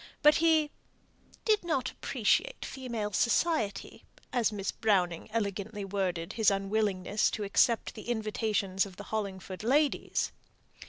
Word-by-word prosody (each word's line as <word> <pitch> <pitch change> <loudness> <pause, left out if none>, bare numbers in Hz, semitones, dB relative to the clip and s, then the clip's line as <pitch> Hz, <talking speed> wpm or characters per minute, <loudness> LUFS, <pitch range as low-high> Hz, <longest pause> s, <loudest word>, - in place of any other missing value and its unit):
But 300 +1 +7
he 315 -2 +3 0.7
"did 430 -3 +3
not 310 -7 -1
appreciate - - 0
female 235 -6 -4
society," 235 - 0 0.3
as 240 -3 +2
Miss 200 -2 -3
Browning 185 -6 +1
elegantly 205 -1 -2
worded 185 -4 -2
his 220 -3 +4
unwillingness 200 0 +1
to 215 - -4
accept 220 +3 +2
the 215 +2 -9
invitations 215 -4 0
of 190 - -13
the 205 - -8
Hollingford 190 -3 -4
ladies. 285 +5 +1
215 Hz, 120 wpm, -30 LUFS, 195-245 Hz, 0.7 s, But